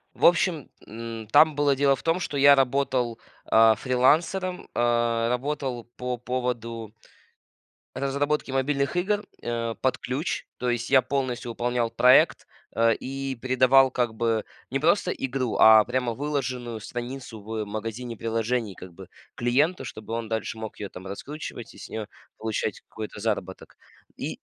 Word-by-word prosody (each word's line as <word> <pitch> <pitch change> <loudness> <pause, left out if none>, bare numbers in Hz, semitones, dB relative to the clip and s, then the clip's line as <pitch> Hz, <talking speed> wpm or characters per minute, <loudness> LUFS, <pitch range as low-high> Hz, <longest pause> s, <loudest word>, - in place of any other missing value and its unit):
В - - +1
общем, 170 -4 +3 0.2
м, 115 0 -7
там 155 +7 +5
было 145 -1 +3
дело 140 0 +3
в - - -11
том, 165 +3 +1
что 145 - -3
я 140 +1 +8
работал, 130 -3 +1 0.3
а, 110 0 +7
фрилансером, 160 - +1
а, 120 -1 +1
работал 130 -1 -2
по 125 0 -2
поводу 115 -3 -4 1.0
разработки 140 +2 -1
мобильных 140 +4 0
игр, 205 +3 +1 0.2
а, 115 -1 -2
под 130 - 0
ключ. 135 +7 -3
То 125 - -1
есть 120 0 -1
я 135 -1 +6
полностью 130 -2 -2
выполнял 120 0 -1
проект, 125 +2 +5 0.3
а, 115 0 +4
и 135 +3 -3
передавал 130 +2 +4
как 120 -3 -1
бы 115 -1 0 0.3
не - - -1
просто - - +2
игру, 130 -2 -2
а 110 0 +9
прямо 125 -1 -1
выложенную 125 -5 -3
страницу 120 -1 -6
в 110 +1 -4
магазине 115 +3 -5
приложений, 115 -2 -1
как 90 -1 -11
бы 95 +1 -12 0.3
клиенту, 135 +6 +1
чтобы 110 -2 -8
он 115 -1 -3
дальше 110 0 -3
мог 110 -1 -6
её 100 - -6
там 95 +1 -10
раскручивать 120 +3 -7
и - - -16
с - - -9
неё 110 -2 -5 0.3
получать 110 -2 -3
какой-то 110 -1 -7
заработок. 100 -4 -3 0.4
И - - -5
125 Hz, 150 wpm, -26 LUFS, 115-135 Hz, 1.0 s, а